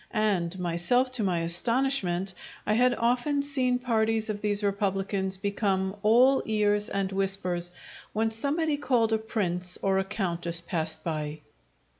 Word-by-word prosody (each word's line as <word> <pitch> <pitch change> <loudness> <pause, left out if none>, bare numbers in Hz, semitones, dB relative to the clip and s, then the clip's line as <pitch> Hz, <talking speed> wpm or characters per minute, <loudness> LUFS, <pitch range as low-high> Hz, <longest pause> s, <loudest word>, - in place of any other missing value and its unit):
And 190 -5 0
myself, 180 +9 +1
to 250 -4 0
my 180 -4 +1
astonishment, 190 0 0 0.3
I 210 - +1
had 245 +2 +3
often 250 +5 +1
seen 260 -3 +1
parties 225 -3 0
of 205 -1 -6
these 205 0 0
republicans 195 -1 -1
become 195 -1 -1
all 245 +6 +5
ears 210 0 +1
and 195 -1 -1
whispers 190 -3 -1 0.4
when 220 +1 0
somebody 290 +6 +1
called 245 -6 +1
a 220 - +2
prince 180 -5 -1
or 195 -1 +2
a - - +1
countess 175 -4 -1
passed 160 -2 -3
by. 155 -2 -4
205 Hz, 140 wpm, -27 LUFS, 185-230 Hz, 0.4 s, all